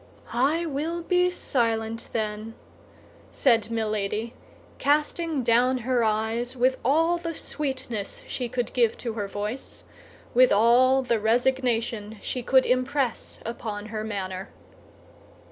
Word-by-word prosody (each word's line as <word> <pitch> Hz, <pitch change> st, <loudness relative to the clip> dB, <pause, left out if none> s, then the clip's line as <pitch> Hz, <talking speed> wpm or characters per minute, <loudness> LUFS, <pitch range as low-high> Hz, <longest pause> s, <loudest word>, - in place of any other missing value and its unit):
"I 290 Hz, +8 st, +2 dB
will 325 Hz, +3 st, -3 dB
be 360 Hz, +1 st, +3 dB
silent, 230 Hz, -8 st, -1 dB
then," 215 Hz, 0 st, -3 dB, 0.7 s
said 230 Hz, -5 st, +2 dB
Milady, 215 Hz, 0 st, -2 dB, 0.5 s
casting 300 Hz, +1 st, +1 dB
down 245 Hz, +2 st, +3 dB
her 250 Hz, -2 st, +2 dB
eyes 225 Hz, +3 st, 0 dB
with 255 Hz, +2 st, +2 dB
all 330 Hz, +6 st, +3 dB
the 335 Hz, -1 st, -4 dB
sweetness 260 Hz, -10 st, -4 dB
she 245 Hz, -2 st, -4 dB
could 245 Hz, 0 st, -2 dB
give 235 Hz, -3 st, +2 dB
to 235 Hz, -3 st, -4 dB
her 205 Hz, -2 st, -3 dB
voice, 210 Hz, +6 st, -6 dB, 0.5 s
with 255 Hz, +1 st, +6 dB
all 250 Hz, +5 st, +5 dB
the 235 Hz, -3 st, +1 dB
resignation 230 Hz, -2 st, 0 dB
she 250 Hz, -, -4 dB
could 260 Hz, +2 st, +4 dB
impress 255 Hz, 0 st, 0 dB
upon 215 Hz, -2 st, -5 dB
her 215 Hz, 0 st, -2 dB
manner. 195 Hz, -2 st, -4 dB
240 Hz, 120 wpm, -26 LUFS, 220-265 Hz, 0.7 s, with